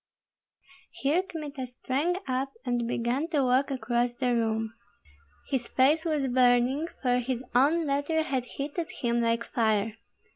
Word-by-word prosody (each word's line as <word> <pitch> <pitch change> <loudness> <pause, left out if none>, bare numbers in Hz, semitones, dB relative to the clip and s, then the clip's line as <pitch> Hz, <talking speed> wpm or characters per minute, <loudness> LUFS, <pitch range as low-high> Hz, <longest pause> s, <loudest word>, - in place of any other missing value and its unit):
Here 295 +6 +1
Kmita 300 -8 -6
sprang 270 +7 -1
up 265 +1 -1
and 240 -2 0
began 240 +6 -1
to 300 -5 +1
walk 255 +2 +2
across 240 -1 0
the 250 -1 0
room. 225 -1 0 0.7
His 255 -3 -1
face 295 +6 +3
was 300 -4 0
burning, 250 +4 +3 0.2
for 250 -1 +3
his 250 0 -2
own 300 +7 +4
letter 290 +3 +1
had 265 -4 -2
heated 290 +6 -4
him 235 0 +2
like 230 0 +1
fire. 220 -2 0
255 Hz, 140 wpm, -28 LUFS, 240-285 Hz, 0.7 s, own